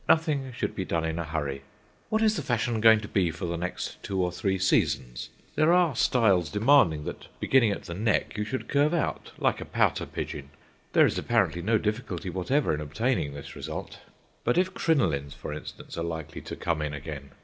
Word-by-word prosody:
Nothing 150 Hz, -5 st, +2 dB
should 120 Hz, -, -3 dB
be 95 Hz, -, -2 dB
done 85 Hz, -2 st, -1 dB
in 80 Hz, +1 st, -2 dB
a -, -, -1 dB
hurry. 70 Hz, -4 st, -3 dB, 0.5 s
What 220 Hz, +1 st, +1 dB
is 215 Hz, -1 st, +4 dB
the 155 Hz, -, -2 dB
fashion 120 Hz, -3 st, 0 dB
going 110 Hz, -1 st, +7 dB
to 105 Hz, -, -6 dB
be 95 Hz, -4 st, +1 dB
for 85 Hz, +2 st, -5 dB
the 85 Hz, 0 st, -2 dB
next 90 Hz, +2 st, -4 dB
two 95 Hz, -1 st, -3 dB
or 90 Hz, -1 st, +1 dB
three 95 Hz, +2 st, -1 dB
seasons? 65 Hz, -9 st, +1 dB, 0.2 s
There 155 Hz, +2 st, +4 dB
are 175 Hz, -6 st, +4 dB
styles 100 Hz, -, +3 dB
demanding 105 Hz, -, +4 dB
that -, -, -7 dB
beginning 130 Hz, -5 st, +4 dB
at -, -, -4 dB
the 85 Hz, -, -6 dB
neck 105 Hz, +4 st, 0 dB
you 105 Hz, -, -1 dB
should 125 Hz, +5 st, -4 dB
curve 150 Hz, +3 st, +2 dB
out, 165 Hz, -, -2 dB
like -, -, +1 dB
a -, -, -5 dB
pouter -, -, +1 dB
pigeon. 70 Hz, -1 st, -5 dB, 0.4 s
There -, -, +7 dB
is -, -, 0 dB
apparently 85 Hz, -, +1 dB
no 110 Hz, +5 st, +2 dB
difficulty 105 Hz, -5 st, -3 dB
whatever 110 Hz, -, +1 dB
in 75 Hz, -, -2 dB
obtaining 75 Hz, -, -1 dB
this 70 Hz, -, -9 dB
result. -, -, -6 dB, 0.4 s
But 120 Hz, -, +1 dB
if 185 Hz, +1 st, +2 dB
crinolines, 80 Hz, -, +1 dB
for 75 Hz, 0 st, -6 dB
instance, 75 Hz, -, -8 dB
are -, -, -1 dB
likely 80 Hz, -2 st, -5 dB
to -, -, -7 dB
come 85 Hz, -3 st, -1 dB
in 75 Hz, -1 st, -2 dB
again! 70 Hz, -1 st, -7 dB
95 Hz, 205 wpm, -27 LUFS, 80-125 Hz, 0.5 s, going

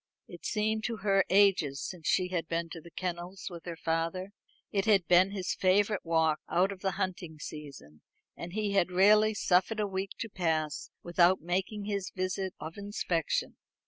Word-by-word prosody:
It -, -, -8 dB
seemed 215 Hz, 0 st, 0 dB
to 230 Hz, -2 st, -2 dB
her 195 Hz, -1 st, +4 dB
ages 185 Hz, -8 st, +4 dB
since 175 Hz, -4 st, -7 dB
she 180 Hz, -1 st, +2 dB
had 170 Hz, -3 st, -2 dB
been 165 Hz, 0 st, -2 dB
to 165 Hz, -1 st, -8 dB
the 170 Hz, -, -13 dB
kennels 180 Hz, +2 st, -5 dB
with 170 Hz, -1 st, -9 dB
her 170 Hz, -1 st, -5 dB
father. 165 Hz, +4 st, -2 dB, 0.4 s
It 195 Hz, -1 st, 0 dB
had 200 Hz, -6 st, +4 dB
been 180 Hz, +3 st, +6 dB
his 195 Hz, -2 st, -2 dB
favourite 200 Hz, +2 st, +2 dB
walk, 160 Hz, -2 st, +2 dB
out 185 Hz, +3 st, +2 dB
of 195 Hz, -, -8 dB
the 190 Hz, -1 st, 0 dB
hunting 175 Hz, -4 st, -4 dB
season, 140 Hz, -, -9 dB, 0.3 s
and 170 Hz, +1 st, -7 dB
he 210 Hz, -1 st, -1 dB
had 195 Hz, -3 st, +2 dB
rarely 210 Hz, +4 st, +5 dB
suffered 190 Hz, +3 st, +2 dB
a 210 Hz, -, +2 dB
week 190 Hz, 0 st, -3 dB
to 230 Hz, -, -4 dB
pass 160 Hz, -7 st, -1 dB
without 175 Hz, +1 st, +3 dB
making 190 Hz, +5 st, -2 dB
his 200 Hz, -2 st, -2 dB
visit 185 Hz, 0 st, -3 dB
of 160 Hz, +4 st, -7 dB
inspection. 190 Hz, -5 st, -1 dB
185 Hz, 175 wpm, -30 LUFS, 165-200 Hz, 0.4 s, been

